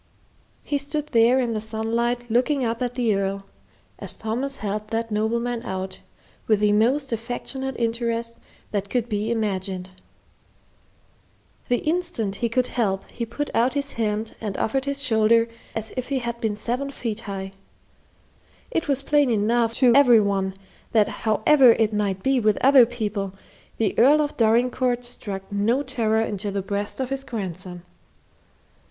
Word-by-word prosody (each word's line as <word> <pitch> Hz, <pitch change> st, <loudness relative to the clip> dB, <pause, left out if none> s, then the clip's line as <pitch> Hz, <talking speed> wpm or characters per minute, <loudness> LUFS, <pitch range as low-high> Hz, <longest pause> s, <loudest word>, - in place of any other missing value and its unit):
He 285 Hz, -, -1 dB
stood 295 Hz, +1 st, -3 dB
there 235 Hz, +1 st, +4 dB
in 240 Hz, -3 st, 0 dB
the 215 Hz, -, -2 dB
sunlight 230 Hz, +2 st, -1 dB
looking 255 Hz, +3 st, +2 dB
up 230 Hz, +1 st, -2 dB
at 245 Hz, -1 st, -2 dB
the 235 Hz, -4 st, +2 dB
Earl, 195 Hz, 0 st, -2 dB, 0.5 s
as -, -, -6 dB
Thomas 250 Hz, +5 st, -3 dB
helped 210 Hz, 0 st, -4 dB
that 230 Hz, 0 st, -2 dB
nobleman 235 Hz, +3 st, -1 dB
out, 190 Hz, -4 st, -5 dB, 0.5 s
with 215 Hz, -2 st, +3 dB
the 210 Hz, 0 st, +4 dB
most 245 Hz, +6 st, +2 dB
affectionate 245 Hz, +3 st, -3 dB
interest 230 Hz, 0 st, -1 dB, 0.3 s
that 200 Hz, -1 st, -2 dB
could 245 Hz, 0 st, 0 dB
be 210 Hz, -1 st, -2 dB
imagined. 190 Hz, -4 st, -2 dB, 1.8 s
The 245 Hz, -, 0 dB
instant 310 Hz, -, -1 dB
he 235 Hz, +1 st, -1 dB
could 250 Hz, +2 st, +1 dB
help, 195 Hz, -5 st, -1 dB
he 235 Hz, -1 st, -4 dB
put 290 Hz, +6 st, -4 dB
out 245 Hz, +4 st, +2 dB
his 280 Hz, 0 st, -1 dB
hand 220 Hz, -1 st, -2 dB
and 210 Hz, -3 st, -3 dB
offered 265 Hz, +4 st, 0 dB
his 280 Hz, 0 st, -1 dB
shoulder 230 Hz, -2 st, +4 dB, 0.3 s
as 220 Hz, 0 st, -3 dB
if 255 Hz, 0 st, -4 dB
he 275 Hz, -, 0 dB
had 235 Hz, -1 st, -4 dB
been 220 Hz, -3 st, 0 dB
seven 250 Hz, +6 st, -3 dB
feet 230 Hz, -5 st, -4 dB
high. 195 Hz, -1 st, -5 dB, 1.2 s
It 330 Hz, -8 st, -1 dB
was 275 Hz, -1 st, +1 dB
plain 290 Hz, -1 st, +3 dB
enough 230 Hz, +1 st, +1 dB
to 250 Hz, -3 st, +5 dB
every 250 Hz, -4 st, +7 dB
one 195 Hz, -2 st, 0 dB, 0.4 s
that 215 Hz, -3 st, +4 dB, 0.2 s
however 255 Hz, +2 st, +6 dB
it 220 Hz, -1 st, +1 dB
might 200 Hz, -2 st, -1 dB
be 270 Hz, -1 st, +3 dB
with 215 Hz, -2 st, +2 dB
other 265 Hz, -3 st, +7 dB
people, 210 Hz, -5 st, -3 dB, 0.4 s
the 215 Hz, -4 st, +1 dB
Earl 285 Hz, +6 st, +6 dB
of 295 Hz, -1 st, -1 dB
Dorincourt 245 Hz, +2 st, +2 dB
struck 200 Hz, -5 st, -6 dB
no 225 Hz, +7 st, +1 dB
terror 225 Hz, -4 st, +1 dB
into 205 Hz, -2 st, -2 dB
the 200 Hz, -1 st, -2 dB
breast 200 Hz, +4 st, -3 dB
of 260 Hz, 0 st, -2 dB
his 270 Hz, 0 st, -2 dB
grandson. 185 Hz, -6 st, -6 dB
230 Hz, 160 wpm, -24 LUFS, 210-255 Hz, 1.8 s, every